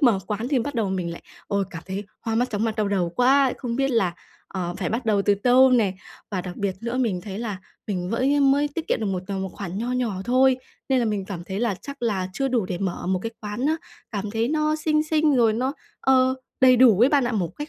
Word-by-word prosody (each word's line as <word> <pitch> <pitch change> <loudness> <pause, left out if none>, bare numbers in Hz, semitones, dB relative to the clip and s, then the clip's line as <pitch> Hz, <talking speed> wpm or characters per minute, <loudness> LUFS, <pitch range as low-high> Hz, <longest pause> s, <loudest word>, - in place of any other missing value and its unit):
mở 240 -9 +4
quán 215 +4 -3
thì 275 -3 +2
bắt 280 +4 -3
đầu 220 -4 0
mình 180 -3 -2
lại - - -9 0.2
ôi, 200 -1 0
cảm 165 -2 -7
thấy 195 +2 -4 0.2
hoa 225 -1 -2
mắt, 245 +2 +1
chóng 210 +1 -1
mặt, 225 0 -1
đau 210 -2 +1
đầu 185 -4 +1
quá, 265 +1 +4
không 240 -2 -3
biết 270 0 +1
là, 190 -8 +1 0.3
ờ, 175 -2 -4
phải - - -2
bắt 230 +2 -3
đầu 205 -2 +3
từ 205 - +3
tâu 250 +5 +5
nè. 220 -6 +3 0.4
Và 190 -3 -1
đặc 180 -1 -7
biệt 200 -2 -1
nữa 235 +2 -3
mình 220 -8 0
thấy 195 +1 -7
là 215 -5 -4 0.3
mình 180 -2 -3
với 275 +5 +2
mới 280 +1 +4
tiết 320 +2 -6
kiệm - - +1
được 215 - -1
một 185 -2 -2
tầm 195 -1 -3
một 190 - -3
khoản 195 -1 -5
nho 240 +2 -2
nhỏ 245 -5 -1
thôi, 255 +1 +4 0.3
nên 265 -1 +3
là 240 - +2
mình 210 -3 -1
cảm 180 -3 -6
thấy 195 +3 -4
là 235 -4 +1
chắc 280 -2 -9
là 195 -5 0
chưa 270 +6 -1
đủ 240 -6 +1
để 180 -2 -3
mở 190 -3 -3
một 185 0 +1
cái 225 - -3
quán 210 +5 -3
á 315 +2 +2 0.3
cảm 210 -1 -3
thấy 225 +2 0
nó 305 +1 +1
xinh 305 0 +1
xinh 310 -2 +2
rồi 230 -2 +4
nó, 255 +5 -1 0.3
ờ, 260 -1 +4 0.3
đầy 255 -1 +7
đủ 235 -5 +6
ấy 250 - +7
bạn 285 -2 +3
ạ, 240 - -1
một 185 -6 0
cách 295 +1 -5
230 Hz, 265 wpm, -24 LUFS, 195-260 Hz, 0.4 s, đầy